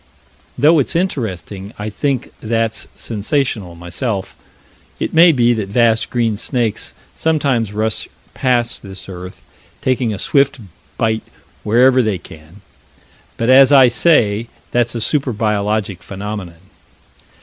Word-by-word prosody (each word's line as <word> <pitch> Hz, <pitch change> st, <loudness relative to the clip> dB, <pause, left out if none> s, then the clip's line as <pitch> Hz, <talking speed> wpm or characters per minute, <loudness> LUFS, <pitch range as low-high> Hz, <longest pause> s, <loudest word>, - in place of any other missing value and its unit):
Though 155 Hz, +2 st, +5 dB
it's 140 Hz, -, 0 dB
interesting, 105 Hz, -, -3 dB
I 105 Hz, +1 st, -5 dB
think 135 Hz, +4 st, -2 dB
that's 115 Hz, 0 st, -1 dB
sensational, 110 Hz, -, -2 dB
myself. 95 Hz, +4 st, -4 dB, 0.6 s
It -, -, -3 dB
may 170 Hz, +1 st, +7 dB
be 120 Hz, -4 st, +3 dB
that 105 Hz, -4 st, -3 dB
vast 115 Hz, +1 st, +2 dB
green 115 Hz, -4 st, 0 dB
snakes 115 Hz, -1 st, -2 dB, 0.2 s
sometimes 140 Hz, -9 st, 0 dB
rush 110 Hz, +1 st, -2 dB, 0.3 s
past 120 Hz, -2 st, 0 dB
this 95 Hz, -2 st, -10 dB
earth, 90 Hz, -1 st, -9 dB, 0.4 s
taking 130 Hz, -3 st, 0 dB
a 105 Hz, -, -3 dB
swift 140 Hz, +7 st, +2 dB, 0.4 s
bite 110 Hz, 0 st, 0 dB, 0.4 s
wherever 125 Hz, +4 st, +4 dB
they 110 Hz, -5 st, 0 dB
can, 80 Hz, +3 st, -15 dB, 0.8 s
but, 115 Hz, +2 st, +2 dB
as 135 Hz, +1 st, +7 dB
I 135 Hz, -3 st, +7 dB
say, 115 Hz, -5 st, +2 dB, 0.2 s
that's 120 Hz, -1 st, +1 dB
a 115 Hz, -, -2 dB
super 135 Hz, 0 st, 0 dB
biologic 105 Hz, -3 st, -1 dB
phenomenon. 95 Hz, -3 st, -7 dB
115 Hz, 125 wpm, -17 LUFS, 100-130 Hz, 0.8 s, may